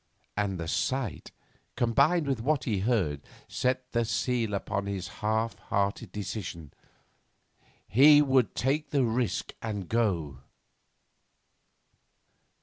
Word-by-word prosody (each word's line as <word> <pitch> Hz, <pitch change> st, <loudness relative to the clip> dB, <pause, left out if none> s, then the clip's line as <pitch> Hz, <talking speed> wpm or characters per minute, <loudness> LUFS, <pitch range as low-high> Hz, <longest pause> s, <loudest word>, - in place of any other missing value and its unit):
And 100 Hz, -3 st, -1 dB
the 85 Hz, -, -4 dB
sight, 130 Hz, -, -2 dB, 0.5 s
combined 135 Hz, +8 st, +3 dB
with 135 Hz, -5 st, -1 dB
what 140 Hz, +1 st, +1 dB
he 105 Hz, -6 st, -1 dB
heard, 95 Hz, -, 0 dB, 0.3 s
set 130 Hz, 0 st, -1 dB
the 120 Hz, 0 st, +1 dB
seal 115 Hz, -1 st, 0 dB
upon 100 Hz, 0 st, -3 dB
his 100 Hz, -2 st, -3 dB
half 110 Hz, 0 st, 0 dB
hearted 100 Hz, +1 st, -1 dB
decision. 90 Hz, -7 st, -6 dB, 1.1 s
He 145 Hz, +6 st, +7 dB
would 135 Hz, -4 st, +3 dB
take 145 Hz, +4 st, 0 dB
the 140 Hz, -2 st, +2 dB
risk 120 Hz, 0 st, -1 dB
and 105 Hz, -5 st, -4 dB
go. 85 Hz, -, 0 dB
110 Hz, 110 wpm, -28 LUFS, 100-130 Hz, 1.1 s, He